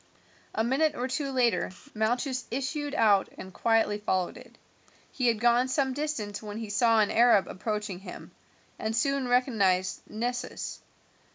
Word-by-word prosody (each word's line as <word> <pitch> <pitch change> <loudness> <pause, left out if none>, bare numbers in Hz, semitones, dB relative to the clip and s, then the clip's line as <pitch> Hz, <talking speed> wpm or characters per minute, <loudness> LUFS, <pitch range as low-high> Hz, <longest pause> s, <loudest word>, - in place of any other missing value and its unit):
A 220 - +1
minute 275 +6 +2
or 250 - -2
two 275 +2 -2
later 250 -3 +2 0.2
Malchus 245 +4 -1
issued 285 +3 -3
out 205 -5 +4
and 190 0 -9
quietly 225 -2 +2
followed 185 -4 -1
it. - - -14 0.5
He 255 -3 0
had 230 -2 +2
gone 240 +2 +3
some 265 0 0
distance 255 -8 -3
when 210 -1 -7
he 220 -2 -5
saw 225 +1 +4
an 210 - +1
Arab 230 -4 +5
approaching 210 -1 -4
him, 195 - -10 0.5
and 220 0 -2
soon 275 +1 +1
recognized 205 -7 +2
Nessus. 245 +3 -4
235 Hz, 150 wpm, -28 LUFS, 210-260 Hz, 0.5 s, Arab